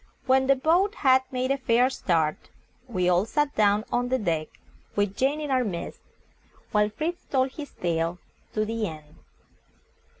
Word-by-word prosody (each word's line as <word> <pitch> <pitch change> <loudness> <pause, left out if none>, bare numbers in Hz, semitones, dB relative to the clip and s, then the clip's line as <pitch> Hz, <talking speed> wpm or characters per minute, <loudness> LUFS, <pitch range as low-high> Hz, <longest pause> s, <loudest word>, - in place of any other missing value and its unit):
When 265 0 +3
the 275 - +5
boat 345 +9 +2
had 260 0 +6
made 255 +1 -1
a 275 - 0
fair 245 0 +3
start, 160 -9 -1 0.4
we 185 -7 0
all 180 +1 +4
sat 295 +4 0
down 210 0 +3
on 245 0 0
the 260 - +2
deck, 165 -8 -1 0.5
with 205 -1 0
Jane 275 +3 +1
in 295 -2 -4
our 255 -1 +3
midst, 180 -7 -5 0.7
while 210 0 +3
Fritz 320 +11 -4
told 260 -1 +1
his 290 +1 -8
tale 170 0 -1 0.4
to 215 0 0
the 225 -1 -2
end. 155 -2 -10
235 Hz, 165 wpm, -26 LUFS, 185-265 Hz, 0.7 s, had